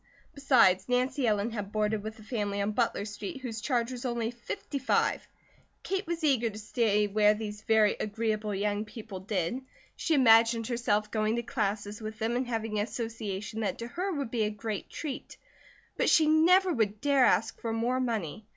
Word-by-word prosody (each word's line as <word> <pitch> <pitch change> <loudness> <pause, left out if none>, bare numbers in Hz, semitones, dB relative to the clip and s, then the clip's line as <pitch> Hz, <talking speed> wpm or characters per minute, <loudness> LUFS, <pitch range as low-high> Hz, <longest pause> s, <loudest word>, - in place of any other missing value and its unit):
Besides, 230 -10 +4
Nancy 250 +1 +1
Ellen 210 +1 +1
had 205 -3 -5
boarded 215 0 0
with 220 +1 -7
a 215 - -13
family 205 -3 -2
on 200 +1 0
Butler 220 -2 0
Street 240 - -6
whose 225 -4 -5
charge 240 0 0
was 245 -1 -6
only 235 -2 -1
five 240 - -22
fifty. 280 -2 -5 1.0
Kate 385 0 -2
was 340 -1 -3
eager 255 -6 +3
to 210 - -9
stay 210 -1 +1
where 210 +1 +3
these 210 -1 -6
very 215 -1 +3
agreeable 215 -1 -2
young 205 +1 -1
people 215 -3 -8
did, 195 +4 -2 0.3
she 325 - 0
imagined 230 -3 +5
herself 215 -3 0
going 215 0 +1
to 235 - -2
classes 205 -2 -2
with 215 0 -6
them 225 +2 -1
and 250 0 -1
having 225 -3 -2
association 220 -2 -4
that 215 - -1
to 235 0 -6
her 370 +8 -2
would 280 -8 -3
be 235 - -1
a - - 0
great 210 -1 -5
treat, 295 -4 -6 0.6
but - - +2
she 315 - +5
never 350 +4 +5
would 215 -4 0
dare 280 -1 +4
ask - - +1
for 230 - -2
more 235 +3 0
money. 220 - -3
225 Hz, 185 wpm, -29 LUFS, 210-250 Hz, 1.0 s, imagined